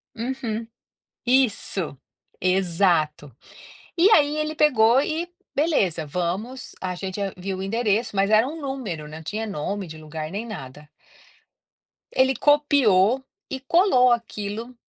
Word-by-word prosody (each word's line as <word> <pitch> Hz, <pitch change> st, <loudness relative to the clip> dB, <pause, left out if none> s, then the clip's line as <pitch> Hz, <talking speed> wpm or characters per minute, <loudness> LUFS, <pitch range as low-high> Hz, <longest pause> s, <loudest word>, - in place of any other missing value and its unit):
Uhum. 230 Hz, -2 st, -4 dB, 0.6 s
Isso, 220 Hz, -, +1 dB, 0.4 s
exato. 170 Hz, -, +1 dB, 0.6 s
E 355 Hz, +4 st, +6 dB
aí 295 Hz, -5 st, +4 dB
ele 305 Hz, 0 st, -2 dB
pegou 255 Hz, -5 st, +4 dB
e 325 Hz, +4 st, -2 dB, 0.2 s
beleza, 205 Hz, -, +1 dB
vamos, 180 Hz, -, -4 dB
a 185 Hz, -1 st, -3 dB
gente 190 Hz, +2 st, -5 dB, 0.2 s
viu 190 Hz, +1 st, -4 dB
o 190 Hz, -, -4 dB
endereço, 220 Hz, +1 st, 0 dB
mas 195 Hz, +1 st, +2 dB
era 220 Hz, +3 st, +4 dB
um 320 Hz, +4 st, -6 dB
número, 245 Hz, -, -5 dB
não 155 Hz, +1 st, -9 dB
tinha 210 Hz, +8 st, -4 dB
nome 200 Hz, +1 st, -3 dB
de 160 Hz, -1 st, -9 dB
lugar 155 Hz, 0 st, -6 dB
nem 210 Hz, +4 st, -4 dB
nada. 150 Hz, -, -9 dB, 1.3 s
Aí -, -, +4 dB
ele 265 Hz, 0 st, +1 dB
copiou 265 Hz, -6 st, +3 dB, 0.3 s
e 265 Hz, -, -4 dB
colou 270 Hz, -3 st, +4 dB
aquilo, 230 Hz, 0 st, -3 dB
215 Hz, 130 wpm, -24 LUFS, 180-265 Hz, 1.3 s, E